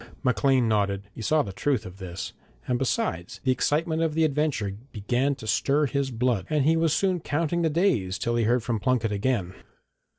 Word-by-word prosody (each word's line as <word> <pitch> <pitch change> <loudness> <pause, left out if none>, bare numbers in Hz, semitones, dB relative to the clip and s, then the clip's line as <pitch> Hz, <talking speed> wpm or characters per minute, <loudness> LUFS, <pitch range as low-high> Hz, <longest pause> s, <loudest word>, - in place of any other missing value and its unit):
Maclean 125 0 +3
nodded. 100 -2 +1
He - - -8
saw 155 +7 +2
the 100 - -7
truth 135 +1 0
of 90 +1 -9
this, 95 -1 -6 0.3
and 125 -1 0
besides, 90 -9 -2
the 130 - +3
excitement 160 +5 0
of 160 -2 0
the 160 - +3
adventure 145 -10 0 0.2
began 125 +7 0
to 110 - -10
stir 140 +6 +2
his 140 0 -1
blood, 120 -4 0
and 150 -3 +1
he 160 +2 +4
was 165 -1 +2
soon 185 +3 +1
counting 165 +2 -1
the 165 - +2
days 150 - +1
till 120 +3 -1
he 115 -2 +2
heard 120 +1 +2
from 115 -2 -1
Plunket 125 -2 +1
again. 100 -3 -1
130 Hz, 195 wpm, -26 LUFS, 105-150 Hz, 0.3 s, he